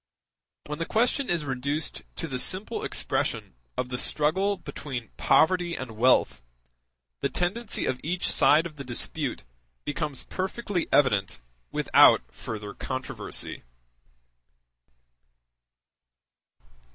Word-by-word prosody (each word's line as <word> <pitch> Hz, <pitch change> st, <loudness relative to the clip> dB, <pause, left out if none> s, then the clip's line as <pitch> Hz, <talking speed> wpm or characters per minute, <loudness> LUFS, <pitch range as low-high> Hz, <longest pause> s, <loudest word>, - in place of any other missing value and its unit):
When 150 Hz, 0 st, -5 dB
the 165 Hz, -, -2 dB
question 245 Hz, +4 st, +1 dB
is 170 Hz, -4 st, +1 dB
reduced 140 Hz, +3 st, -2 dB
to -, -, -3 dB
the 130 Hz, -1 st, -3 dB
simple 185 Hz, +9 st, +1 dB
expression -, -, -2 dB, 0.2 s
of 125 Hz, -, -2 dB
the 125 Hz, -1 st, -2 dB
struggle 190 Hz, +7 st, +1 dB
between 135 Hz, -8 st, -6 dB
poverty 175 Hz, 0 st, +3 dB
and 130 Hz, -3 st, -6 dB
wealth, 115 Hz, -, +3 dB, 0.8 s
the -, -, 0 dB
tendency 210 Hz, +6 st, 0 dB
of 125 Hz, -, -1 dB
each 175 Hz, +3 st, -1 dB
side 150 Hz, +4 st, +5 dB
of 155 Hz, -3 st, -8 dB
the 140 Hz, -, -6 dB
dispute 120 Hz, -, -2 dB, 0.4 s
becomes 145 Hz, -2 st, -2 dB
perfectly 190 Hz, -1 st, -3 dB
evident 100 Hz, -, +3 dB, 0.3 s
without -, -, +6 dB
further 105 Hz, -2 st, -6 dB
controversy. 130 Hz, -4 st, -5 dB
150 Hz, 105 wpm, -27 LUFS, 130-180 Hz, 0.8 s, without